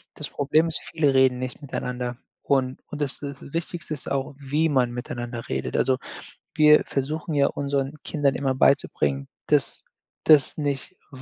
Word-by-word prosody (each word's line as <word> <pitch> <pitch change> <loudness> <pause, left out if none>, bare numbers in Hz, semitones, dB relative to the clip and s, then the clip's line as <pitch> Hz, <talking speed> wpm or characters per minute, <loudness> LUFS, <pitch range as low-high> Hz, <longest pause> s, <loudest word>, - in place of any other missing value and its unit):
Das 150 - -6
Problem 150 +3 +2
ist, 165 - -2
viele 150 -4 +1
reden 130 -1 +4
nicht 130 +2 -5
miteinander. 125 -3 -4 0.3
Und 130 -2 +1
und 150 - -7
das 140 -2 -2
das 140 -1 -8
Wichtigste 170 -1 -3
ist 145 - -3
auch, 135 0 -2
wie 145 +3 0
man 130 -4 +2
miteinander 120 -1 -5
redet. 65 0 -2
Also, 130 -1 +2 0.6
wir 150 -1 +7
versuchen 150 +4 -2
ja 140 -1 +4
unseren 140 -1 -1
Kindern 140 -3 +1
immer 135 -1 0
beizubringen, 70 - +2 0.2
dass - - +1 0.4
dass 150 -4 +5
nicht, 145 -1 -2 0.2
w 130 -2 -11
140 Hz, 160 wpm, -25 LUFS, 130-150 Hz, 0.6 s, wir